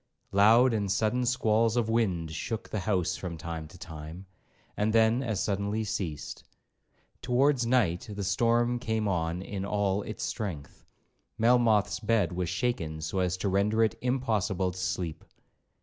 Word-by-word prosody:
Loud 115 +5 +5
and 100 -3 -1
sudden 115 +4 +1
squalls 115 -1 +2
of 115 -2 +1
wind 95 -8 0
shook 110 +7 -4
the 105 - -2
house 95 -3 0
from 85 -3 -6
time 80 -1 -6
to 90 - -14
time, 80 +2 -9 0.5
and 105 +1 0
then 115 +2 +4
as 110 -7 -2
suddenly 100 +2 -1
ceased. 95 -8 -4 0.8
Towards 125 0 +2
night 110 -8 +1
the 100 0 -4
storm 120 +4 +2
came 110 -2 -1
on 85 -1 -1
in 95 -1 -5
all 100 0 0
its 110 - -6
strength; 85 -10 -5 0.5
Melmoth's 115 -3 +3
bed 110 -2 +1
was 90 -1 -2
shaken 90 -6 -2
so 80 +5 -3
as 90 0 0
to 95 - -2
render 100 +4 +2
it 110 - +1
impossible 110 -7 0
to 90 - -11
sleep. 85 -3 -3
105 Hz, 150 wpm, -29 LUFS, 90-115 Hz, 0.8 s, Loud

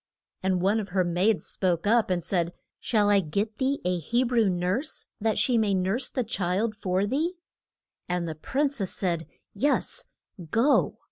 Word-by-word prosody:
And 185 -1 0
one 205 +4 +3
of 205 -2 -5
her 185 0 +2
maids 180 +5 +1
spoke 175 -2 0
up, 225 +1 +3
and 180 -2 0
said, 175 -1 -1 0.3
Shall 210 -3 +2
I 200 - +5
get 200 +6 -2
thee 275 +1 +1
a 180 -1 +1
He 235 - +1
brew 235 -4 +2
nurse, 185 - -2
that 220 0 0
she 245 -3 +3
may 205 -3 +2
nurse 195 +8 0
the 255 - -1
child 205 0 -1
for 190 -1 0
thee? 310 - -1 0.7
And 180 -1 -1
the 160 - -3
prin 270 - -1
cess 205 -10 -3
said, 170 -4 -2 0.3
Yes; 280 +8 0 0.4
go. 250 - +3
200 Hz, 175 wpm, -27 LUFS, 180-235 Hz, 0.7 s, I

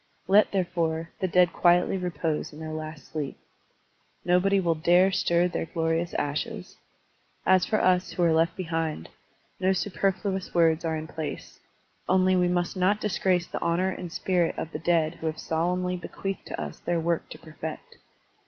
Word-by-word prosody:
Let, 200 +3 +5
therefore, 170 -3 -1
the 190 - 0
dead 180 0 +4
quietly 175 +1 +3
repose 165 -4 -2
in 150 - -12
their 160 0 -6
last 155 0 -7
sleep. 150 -3 -4 0.9
Nobody 180 +3 +3
will 170 -3 +2
dare 175 +4 +4
stir 175 -2 +2
their 175 - -3
glorious 165 0 -1
ashes. 185 +7 -3 0.7
As 185 -1 +4
for 215 - +1
us 180 0 +2
who 175 - 0
are 165 -1 +4
left 165 +1 +2
behind, 165 - -3 0.5
no 190 +1 +3
superfluous 190 0 -1
words 165 -2 +3
are 160 -1 -1
in 155 - -5
place, 155 -2 -6 0.5
only 185 0 +4
we 180 -1 +3
must 175 +1 0
not 190 +3 +2
disgrace 185 -4 +1
the - - -6
honor 180 +3 +1
and 180 -2 -6
spirit 175 -1 0
of 160 - -4
the 150 - -5
dead 165 -1 +2
who 160 - -2
have 155 0 -2
solemnly 180 +3 -1
bequeathed 195 +2 -5
to - - -5
us - - -6
their 175 -1 -1
work 170 0 -1
to - - -9
perfect. 160 0 -8
175 Hz, 170 wpm, -27 LUFS, 160-185 Hz, 0.9 s, Let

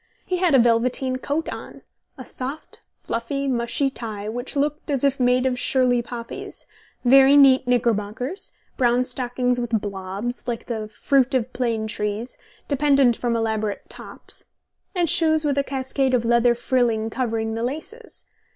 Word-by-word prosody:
He 365 - -1
had 350 -5 +3
a - - +8
velveteen 245 +2 +2
coat 290 +5 -2
on, - - -9 0.3
a - - -7
soft, 270 +4 -6 0.2
fluffy, 275 +5 -3
mushy 255 +2 0
tie 215 -5 -6
which 245 +6 -3
looked 295 +2 -1
as 275 -3 0
if 275 -1 +2
made 250 +1 +3
of 250 -1 0
Shirley 250 -2 +2
poppies, 235 0 -8 0.4
very 270 +3 +7
neat 265 -2 +6
knickerbockers, 240 - -1 0.3
brown 245 0 +3
stockings 250 0 -1
with 235 -2 0
blobs, 200 +5 -5
like 235 -2 -3
the 220 -3 -4
fruit 265 +4 +1
of 255 0 -1
plane 230 -3 -1
trees, 210 +2 -4 0.3
dependent 275 -4 +3
from 235 0 -1
elaborate 220 -2 -2
"tops", - - -10 0.5
and 350 -2 +2
shoes 315 -1 +2
with 285 -2 +1
a 280 - +1
cascade 265 -1 -1
of 235 -2 0
leather 235 +1 +4
frilling 235 -3 0
covering 225 -3 -2
the 225 - -3
laces. 315 - -6
245 Hz, 150 wpm, -23 LUFS, 230-275 Hz, 0.5 s, a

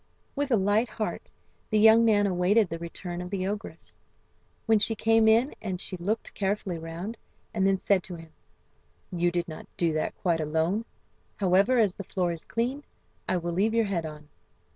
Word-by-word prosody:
With 285 0 -1
a 245 - +4
light 210 +3 +2
heart 215 0 -4 0.4
the 215 - +2
young 220 +2 +7
man 210 -3 +4
awaited 190 +2 +2
the 165 +1 -5
return 175 +1 -6
of 180 - -6
the 190 -1 -2
ogress. 205 +2 -5 0.7
When 225 -2 +4
she 225 +2 +2
came 225 +1 +3
in 230 +5 +4 0.2
she 185 - -4
looked 200 +6 -3
carefully 195 -3 -2
round, 170 +8 -6 0.3
and 195 -3 +2
then 195 0 +3
said 190 0 +2
to 180 - -6
him: 165 -1 -12 0.8
"You 175 -1 +1
did 175 -1 -2
not 155 -2 -9
do 170 -2 +1
that 155 - -2
quite 170 -3 0
alone. 160 +8 0 0.5
However, 195 +6 +3
as 210 -6 +3
the 200 - -7
floor 180 -2 -1
is 165 -1 -7
clean 250 +5 -2 0.5
I 185 - +2
will 170 0 -3
leave 210 +6 +1
your 230 -1 +3
head 175 -5 -2
on." 150 -1 -11
195 Hz, 185 wpm, -27 LUFS, 175-220 Hz, 0.8 s, young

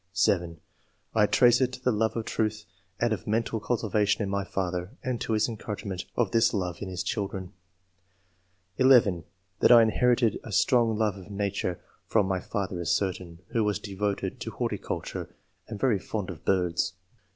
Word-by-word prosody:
(7) 85 -4 +1 0.5
I 105 -2 +4
trace 120 +3 +5
it 130 -1 +2
to 125 - -6
the 125 0 +1
love 110 0 0
of 115 - -2
truth 110 -1 -1 0.3
and 120 -2 +2
of 110 +2 -6
mental 110 +1 0
cultivation 105 -2 0
in 100 - -3
my 100 0 0
father, 90 +3 -3
and 125 -3 -2
to 115 - -1
his 110 - +2
encouragement 105 -4 -5
of 115 -6 +1
this 115 -1 +3
love 90 -3 -2
in 100 - -4
his 90 0 -3
children. 95 -2 -3 1.2
(11) 115 -10 +5 0.3
That - - +5
I 120 -1 +9
inherited 120 +1 +2
a 110 - -8
strong 115 +2 +3
love 105 -3 0
of 95 +1 -12
nature 100 -3 -2 0.3
from 105 -3 +3
my 95 -1 0
father 95 -1 -3
is 85 - -2
certain, 90 -1 -2
who 115 - +1
was 105 -2 +1
devoted 100 0 -3
to - - -5
horticulture - - -4 0.3
and 105 -2 -7
very 110 -4 +2
fond 100 -1 -4
of 80 -3 -11
birds. 90 -2 +1
105 Hz, 175 wpm, -27 LUFS, 95-115 Hz, 1.2 s, I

